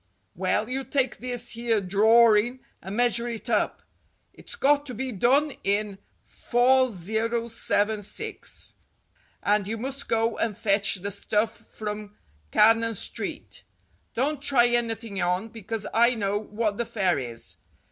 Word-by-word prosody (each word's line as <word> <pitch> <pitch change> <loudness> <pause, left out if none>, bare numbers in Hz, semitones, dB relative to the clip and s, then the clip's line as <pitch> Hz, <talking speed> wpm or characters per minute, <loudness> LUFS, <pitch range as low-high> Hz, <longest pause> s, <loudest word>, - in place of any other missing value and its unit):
"Well, 215 +1 0
you 265 +2 -3
take 265 -2 0
this 245 -1 -1
here 230 -1 0
drorin' 220 +5 +4 0.2
and 195 +3 -6
measure 240 -1 +2
it 230 -2 -5
up. - - 0 0.5
It's - - -6
got 285 +1 +3
to 250 - -6
be 260 +3 -3
done 265 +8 +2
in 200 0 0 0.3
4076, 230 - 0 0.7
and 205 -1 +2
you 225 +2 -3
must 270 +4 -3
go 225 0 +1
and 215 -3 -1
fetch 200 -1 +2
the 200 +2 -5
stuff 210 +2 0
from 210 -1 -7 0.3
Cannon 225 - +4
Street. - - -4 0.5
Don't 280 +4 0
try 265 -4 +4
anything 225 -4 -1
on, 180 +5 0
because 225 0 -5
I 235 +2 +4
know 205 -1 -1
what 210 0 -2
the 235 - -1
fare 190 -9 +1
is. 120 -3 -7
225 Hz, 130 wpm, -26 LUFS, 205-240 Hz, 0.7 s, drorin